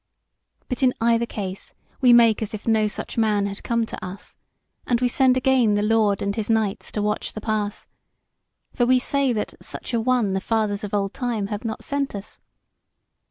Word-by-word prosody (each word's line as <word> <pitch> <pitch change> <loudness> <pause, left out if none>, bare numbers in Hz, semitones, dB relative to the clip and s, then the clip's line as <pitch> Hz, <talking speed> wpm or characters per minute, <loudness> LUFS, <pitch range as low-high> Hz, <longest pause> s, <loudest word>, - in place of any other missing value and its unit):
But 250 +1 -4
in 255 -1 +3
either 235 0 +2
case 195 -3 -6 0.3
we 250 -2 +6
make 230 -2 +6
as 215 0 -3
if 210 - -10
no 220 -1 +3
such 210 - -4
man 210 -2 +2
had 200 0 -5
come 235 -1 0
to - - -8
us, 185 +2 -8 0.5
and 240 -2 +2
we 250 - +2
send 255 +1 +3
again 255 -5 +3
the 205 - +1
lord 215 -2 +2
and 200 0 -1
his 220 -1 -3
knights 220 -3 0
to 210 - -1
watch 210 0 -1
the - - -5
pass; 215 -1 -2 0.9
for 245 - +1
we 255 +1 +5
say 275 +1 +1
that 215 -3 -2
such - - -7
an 230 -1 +1
one 240 -5 +2
the 190 - -1
Fathers 215 -1 -1
of 205 0 -3
old 195 -1 -1
time 230 -6 -2
have 205 - -5
not 220 -2 -4
sent 280 -4 -2
us. 200 0 -8
220 Hz, 200 wpm, -23 LUFS, 205-240 Hz, 0.9 s, we